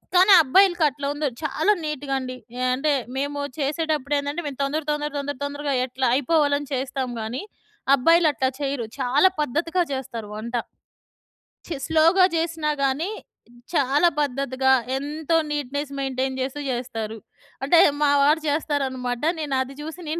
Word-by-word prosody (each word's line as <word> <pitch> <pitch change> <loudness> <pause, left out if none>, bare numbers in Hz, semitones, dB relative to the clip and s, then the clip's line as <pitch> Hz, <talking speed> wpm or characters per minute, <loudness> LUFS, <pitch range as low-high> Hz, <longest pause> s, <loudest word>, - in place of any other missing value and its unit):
కానీ 380 +2 +7
అబ్బాయిలకి 350 +3 +4
అట్లా 280 +1 -5
ఉండదు 290 -5 -3
చాలా 315 +7 +1
నీట్‌గా 290 -2 -3
అండి. 255 -1 -6 0.2
ఆహ్, 255 0 +1
అంటే 295 +2 +1 0.2
మేము 285 +1 -2 0.2
చేసేటప్పుడేందంటే 290 0 -1
మేము 280 -1 -7
తొందర 300 +3 -1
తొందర 295 0 -1
తొందర 280 -1 -4
తొందరగా 285 0 -3
ఎట్ల 260 +1 -6
అయిపోవాలని 290 0 +1
చేస్తాం 260 0 -2
గానీ, 225 +4 -4 0.5
అబ్బాయిలు 330 +4 +4
అట్లా 260 +1 0
చెయ్యరు. 275 -4 -2
చాలా 270 +8 +4
పద్ధతిగా 330 +6 0
జెస్తారు 230 -5 -5
వంట. 230 +3 -6 1.1
చి 330 - -3
స్లో‌గా 330 +4 +5
జెసినా 325 -2 -1
గాని, 275 +6 0 0.7
చాలా 285 +3 +3
పద్ధతిగా 265 -1 0 0.3
ఎంతో 305 +3 -2 0.2
నీట్‌నెస్ 285 0 -3
మెయింటైన్ 265 0 -2
జెస్తూ 265 +3 -3
జెస్తారు. 225 -3 -4 0.5
అంటే 330 +5 +5 0.2
మావారు 290 +2 +4
జెస్తారనమాట. 265 -5 -1 0.2
నేనది 270 -3 -2
జూసి 320 +3 -7
నేను 330 +2 -2
285 Hz, 130 wpm, -23 LUFS, 260-310 Hz, 1.1 s, కానీ